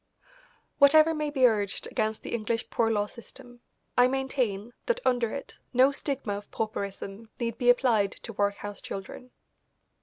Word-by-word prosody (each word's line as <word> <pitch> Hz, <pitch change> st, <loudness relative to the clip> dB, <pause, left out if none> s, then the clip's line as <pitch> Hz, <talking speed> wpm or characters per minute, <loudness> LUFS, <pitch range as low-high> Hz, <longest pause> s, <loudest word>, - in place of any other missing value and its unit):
Whatever 310 Hz, +3 st, +7 dB
may 305 Hz, -1 st, -2 dB
be 270 Hz, -3 st, +3 dB
urged 205 Hz, -4 st, +1 dB
against 215 Hz, 0 st, -2 dB
the -, -, -6 dB
English 230 Hz, 0 st, -2 dB
Poor 225 Hz, -1 st, +2 dB
Law 205 Hz, -2 st, +1 dB
system, 245 Hz, +2 st, -13 dB, 0.3 s
I 245 Hz, 0 st, +6 dB
maintain 255 Hz, -5 st, -1 dB
that 485 Hz, 0 st, +1 dB
under 245 Hz, -3 st, +2 dB
it 275 Hz, -, -7 dB
no 260 Hz, +3 st, +6 dB
stigma 275 Hz, -6 st, -3 dB
of 205 Hz, -, -11 dB
pauperism 200 Hz, 0 st, -5 dB
need 230 Hz, -2 st, -3 dB
be 245 Hz, -1 st, +3 dB
applied 230 Hz, -6 st, +3 dB
to 230 Hz, -, -9 dB
workhouse 205 Hz, 0 st, -2 dB
children. 195 Hz, +6 st, -7 dB
235 Hz, 150 wpm, -28 LUFS, 205-265 Hz, 0.3 s, Whatever